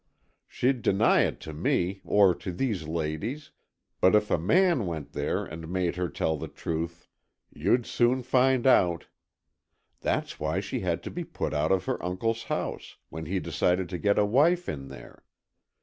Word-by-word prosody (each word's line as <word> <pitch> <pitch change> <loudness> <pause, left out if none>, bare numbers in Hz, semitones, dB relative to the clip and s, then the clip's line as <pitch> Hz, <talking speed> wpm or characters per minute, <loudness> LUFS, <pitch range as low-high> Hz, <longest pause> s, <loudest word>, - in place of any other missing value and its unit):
She'd 125 0 0
deny 100 +1 +4
it - - -4
to 80 - -7
me, 90 +4 0
or 100 -3 +4
to 90 - -6
these 95 -5 -2
ladies, 85 - -3 0.5
but 95 +3 +5
if 105 0 +2
a - - +3
man 165 - +3
went 80 -4 -5
there - - -1
and 80 +1 -8
made 90 -1 -1
her 90 -1 -2
tell 80 -1 -1
the - - -6
truth, 85 +1 -5 0.5
you'd 120 -1 +1
soon 125 +2 +1
find 130 0 +2
out! 90 -10 +4 0.9
That's - - -2
why 80 +4 -1
she 100 - -3
had 85 -2 -2
to - - -6
be 175 - -4
put - - -4
out 75 +3 +1
of 95 -1 +2
her - - -2
uncle's 110 +6 -2
house, - - -4
when 80 -1 -7
he 95 +3 -1
decided 90 +2 0
to 90 - -4
get 100 +2 +2
a 105 - +4
wife 160 +11 +3
in 70 -2 -5
there. 65 -2 -12
95 Hz, 175 wpm, -27 LUFS, 85-120 Hz, 0.9 s, but